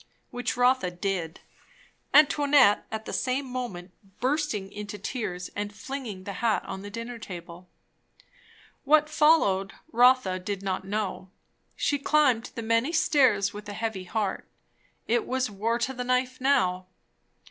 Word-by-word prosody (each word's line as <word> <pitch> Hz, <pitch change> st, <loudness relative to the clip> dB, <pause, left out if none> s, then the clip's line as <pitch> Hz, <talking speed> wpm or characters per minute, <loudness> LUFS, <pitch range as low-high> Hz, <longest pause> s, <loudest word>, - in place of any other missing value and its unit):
Which 245 Hz, 0 st, -3 dB
Rotha 250 Hz, -6 st, +3 dB
did, 175 Hz, -2 st, -3 dB, 0.7 s
Antoinette 285 Hz, -7 st, +5 dB
at 220 Hz, 0 st, -5 dB
the -, -, -6 dB
same 260 Hz, +2 st, -1 dB
moment 240 Hz, -9 st, -6 dB, 0.3 s
bursting 255 Hz, -8 st, -1 dB
into 210 Hz, 0 st, -7 dB
tears 195 Hz, -4 st, -4 dB
and 205 Hz, 0 st, -3 dB
flinging 220 Hz, -3 st, -7 dB
the 200 Hz, -, -6 dB
hat 230 Hz, -3 st, +1 dB
on 190 Hz, 0 st, -6 dB
the 205 Hz, -, -8 dB
dinner 230 Hz, +3 st, -6 dB
table. 175 Hz, -3 st, -9 dB, 1.1 s
What 305 Hz, +1 st, +4 dB
followed, 300 Hz, -12 st, +3 dB, 0.2 s
Rotha 245 Hz, -6 st, +4 dB
did 200 Hz, +1 st, -5 dB
not 190 Hz, -1 st, -2 dB
know. 195 Hz, -2 st, -3 dB, 0.5 s
She 285 Hz, -, 0 dB
climbed 270 Hz, -5 st, +3 dB
the 230 Hz, -, -4 dB
many 230 Hz, +6 st, +1 dB
stairs 260 Hz, -11 st, +3 dB
with 210 Hz, 0 st, -8 dB
a -, -, -5 dB
heavy 220 Hz, -3 st, -4 dB
heart. 200 Hz, +1 st, -2 dB, 0.6 s
It 465 Hz, -3 st, +1 dB
was 255 Hz, -3 st, -1 dB
war 220 Hz, +4 st, -1 dB
to 245 Hz, +3 st, -2 dB
the 250 Hz, -1 st, -4 dB
knife 255 Hz, +1 st, 0 dB
now. 185 Hz, -10 st, +2 dB
225 Hz, 140 wpm, -27 LUFS, 195-260 Hz, 1.1 s, Antoinette